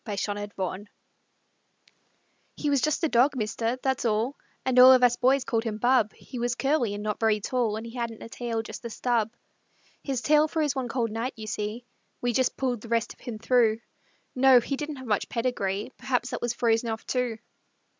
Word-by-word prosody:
JUST 205 Hz, 0 st, -2 dB
OUR 205 Hz, 0 st, -3 dB
DOG 195 Hz, 0 st, -5 dB, 1.7 s
He 295 Hz, -, -1 dB
was 280 Hz, -3 st, +2 dB
just 305 Hz, +3 st, 0 dB
a -, -, +4 dB
dog, 270 Hz, +1 st, +3 dB
mister 230 Hz, +1 st, -1 dB
that's 265 Hz, -1 st, 0 dB
all; 230 Hz, +4 st, 0 dB, 0.3 s
And 255 Hz, -1 st, +3 dB
all 255 Hz, +1 st, +10 dB
of 255 Hz, -1 st, +6 dB
us 245 Hz, -1 st, +5 dB
boys 260 Hz, +2 st, +3 dB
called 225 Hz, -1 st, -1 dB
him 220 Hz, -2 st, -3 dB
Bub; 240 Hz, -2 st, +3 dB
He 255 Hz, -, -9 dB
was 240 Hz, 0 st, 0 dB
curly 270 Hz, -7 st, +1 dB
and 205 Hz, -, -6 dB
not 210 Hz, -1 st, -2 dB
very 220 Hz, -2 st, +2 dB
tall 230 Hz, 0 st, -1 dB
And 220 Hz, +1 st, -5 dB
he 230 Hz, -, -9 dB
hadn't 235 Hz, -2 st, -4 dB
a -, -, -7 dB
tail 230 Hz, -1 st, -3 dB
just -, -, -9 dB
a 235 Hz, -, -5 dB
stub. 230 Hz, -1 st, 0 dB, 0.7 s
His 265 Hz, -4 st, -2 dB
tail 300 Hz, +2 st, +4 dB
froze 305 Hz, -3 st, 0 dB
one 260 Hz, -2 st, -2 dB
cold 235 Hz, -2 st, -1 dB
night, 230 Hz, +4 st, -3 dB
you 220 Hz, -, -8 dB
see; 215 Hz, +2 st, -4 dB, 0.3 s
We 245 Hz, 0 st, -1 dB
just 260 Hz, +2 st, +1 dB
pulled 250 Hz, -4 st, -1 dB
the 230 Hz, -, -10 dB
rest 230 Hz, 0 st, 0 dB
of -, -, -30 dB
him 235 Hz, -3 st, -6 dB
through. 230 Hz, -1 st, +2 dB, 0.5 s
No 260 Hz, -1 st, +6 dB
he 275 Hz, +4 st, -3 dB
didn't 295 Hz, +2 st, -5 dB
have 260 Hz, -1 st, -9 dB
much 210 Hz, -4 st, -1 dB
pedigree 225 Hz, -3 st, -2 dB
Perhaps 250 Hz, -1 st, -1 dB
that -, -, -4 dB
was 240 Hz, 0 st, -1 dB
frozen 230 Hz, 0 st, +1 dB
off, 220 Hz, 0 st, -4 dB
too. 250 Hz, -3 st, -1 dB
240 Hz, 205 wpm, -27 LUFS, 220-255 Hz, 1.7 s, all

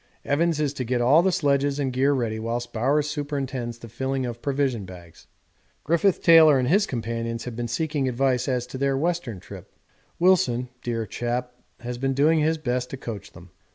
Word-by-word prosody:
Evans 160 Hz, +2 st, +1 dB
is 145 Hz, -2 st, 0 dB
to 135 Hz, -, -3 dB
get 125 Hz, +1 st, -1 dB
all 135 Hz, +7 st, +5 dB
the 190 Hz, +2 st, +2 dB
sledges 140 Hz, -3 st, +1 dB
and 135 Hz, -3 st, -1 dB
gear 135 Hz, +3 st, +2 dB
ready 115 Hz, -5 st, -1 dB
whilst 120 Hz, +2 st, -4 dB
Bowers 140 Hz, +6 st, +1 dB
superintends 140 Hz, -5 st, -4 dB
the 115 Hz, -, -11 dB
filling 130 Hz, +3 st, -2 dB
of 120 Hz, -1 st, -6 dB
provision 135 Hz, -6 st, -1 dB
bags. 90 Hz, -3 st, -13 dB, 0.6 s
Griffith 170 Hz, +4 st, +1 dB
Taylor 160 Hz, -4 st, +7 dB
and 125 Hz, -1 st, 0 dB
his 200 Hz, +3 st, +3 dB
companions 115 Hz, -1 st, -3 dB
have 125 Hz, -2 st, -6 dB
been 120 Hz, 0 st, -3 dB
seeking 145 Hz, +2 st, -1 dB
advice 125 Hz, 0 st, 0 dB
as 125 Hz, -2 st, 0 dB
to 125 Hz, +1 st, -8 dB
their 135 Hz, 0 st, +1 dB
Western 160 Hz, -, -2 dB
trip. -, -, -12 dB, 0.5 s
Wilson, 170 Hz, -9 st, +2 dB
dear 115 Hz, -2 st, -2 dB
chap, 125 Hz, +2 st, -3 dB, 0.3 s
has 120 Hz, 0 st, -5 dB
been 135 Hz, 0 st, 0 dB
doing 155 Hz, +4 st, +4 dB
his 160 Hz, +1 st, +1 dB
best 125 Hz, -4 st, -2 dB
to 135 Hz, -, -6 dB
coach 110 Hz, -6 st, -7 dB
them. 85 Hz, +1 st, -14 dB
130 Hz, 190 wpm, -24 LUFS, 120-145 Hz, 0.6 s, Taylor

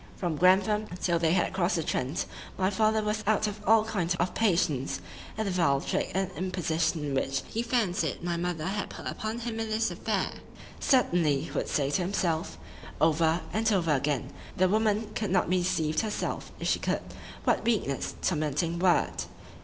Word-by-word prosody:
From 175 Hz, -4 st, -2 dB
Grantham, 195 Hz, +5 st, +3 dB
till 170 Hz, -2 st, +1 dB
they 165 Hz, 0 st, +2 dB
had 190 Hz, -, +1 dB
cross'd 180 Hz, -1 st, +1 dB
the 165 Hz, -, 0 dB
Trent, 135 Hz, +1 st, -1 dB, 0.3 s
my 190 Hz, +1 st, +1 dB
father 215 Hz, +2 st, +2 dB
was 210 Hz, 0 st, -1 dB
out 215 Hz, 0 st, +3 dB
of 210 Hz, 0 st, -3 dB
all 220 Hz, 0 st, +6 dB
kind 180 Hz, -6 st, 0 dB
of 175 Hz, +2 st, 0 dB
patience 170 Hz, -, +1 dB, 0.4 s
at 220 Hz, -, -1 dB
the 200 Hz, -, -1 dB
vile 165 Hz, -7 st, +3 dB
trick -, -, -2 dB
and 190 Hz, 0 st, 0 dB
imposition 165 Hz, -5 st, -1 dB
which 135 Hz, 0 st, 0 dB
he 225 Hz, -, -2 dB
fancied 225 Hz, -8 st, 0 dB
my 175 Hz, -1 st, -1 dB
mother 170 Hz, -2 st, -2 dB
had 200 Hz, +2 st, -2 dB
put -, -, -9 dB
upon 220 Hz, +1 st, -3 dB
him 225 Hz, -1 st, -4 dB
in 225 Hz, 0 st, -2 dB
this 225 Hz, +1 st, +1 dB
affair—"Certainly," 170 Hz, -, 0 dB
he -, -, -7 dB
would -, -, -2 dB
say 140 Hz, -1 st, 0 dB
to 180 Hz, -, +1 dB
himself, 175 Hz, -3 st, -1 dB, 0.4 s
over 160 Hz, +1 st, +3 dB
and 220 Hz, +1 st, +2 dB
over 175 Hz, -6 st, +2 dB
again, 140 Hz, -1 st, -1 dB, 0.2 s
"the 185 Hz, -, +4 dB
woman 215 Hz, +1 st, +1 dB
could 210 Hz, -2 st, -2 dB
not 185 Hz, 0 st, +2 dB
be 185 Hz, -, +3 dB
deceived 160 Hz, -4 st, 0 dB
herself——if 215 Hz, -2 st, -3 dB
she -, -, +2 dB
could,——"what -, -, -2 dB
weakness!"—tormenting 165 Hz, -, -1 dB
word! 175 Hz, -3 st, +2 dB
180 Hz, 170 wpm, -28 LUFS, 160-215 Hz, 0.4 s, all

